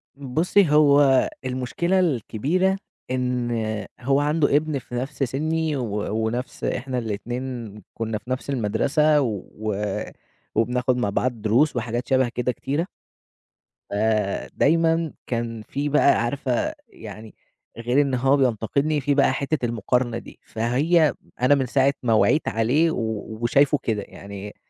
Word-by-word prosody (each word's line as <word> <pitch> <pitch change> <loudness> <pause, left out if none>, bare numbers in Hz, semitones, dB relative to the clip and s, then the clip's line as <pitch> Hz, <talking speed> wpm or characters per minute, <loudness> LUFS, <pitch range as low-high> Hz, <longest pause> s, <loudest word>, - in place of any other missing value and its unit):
بُصّي 155 +7 +2
هو 145 -3 +5 0.2
المشكلة 130 +9 0
الكبيرة، 170 - +1 0.3
إن 125 -1 -1 0.5
هو 135 +3 +2
عنده 145 0 +2
إبن 150 -1 +1
في 125 0 -9
نفْس 135 +3 -3
سني 155 +4 -1
و 105 -5 -3
ونفْس 120 +3 -4
إحنا 130 0 -2
الإتنين 120 +1 -4 0.2
كنا 110 -1 -3
في 105 +4 -14
نفْس 130 +2 -3
المدرسة، 140 +6 +2
و 110 -2 -3 0.8
وبناخد 125 +3 +1
مع 115 -5 0
بعض 120 +2 -1
دروس 125 +8 +3
وحاجات 120 +1 -2
شبه 130 -2 +2
كده 125 +1 -1
كتيرة 145 +8 -2 1.0
آآ 105 -1 0
دايمًا 165 0 +2
كان 115 -2 -3
في 145 +1 -2
بَقى 140 -4 +4
عارفة 130 - -1 0.2
يعني، 110 0 -11 0.4
غير 120 +4 +2
إن 135 -2 0
هو 135 +3 +3
بينتقدني 140 +5 +1
في 140 +1 +1
بقى 140 -2 +4
حتّة 140 -1 -1
المقارنة 120 +1 0
دي، - - -11
فهي 145 +7 +2 0.3
أنا 130 +3 +5
من 135 -2 0
ساعة 135 +2 +2
ما 115 -2 +2
وعيت 150 +7 +3
عليه 130 +9 +2
و - - -3 0.4
وشايفه 140 +5 +3
كده، 110 -3 -1
يعني 100 +1 -9
130 Hz, 135 wpm, -23 LUFS, 115-145 Hz, 1.0 s, هو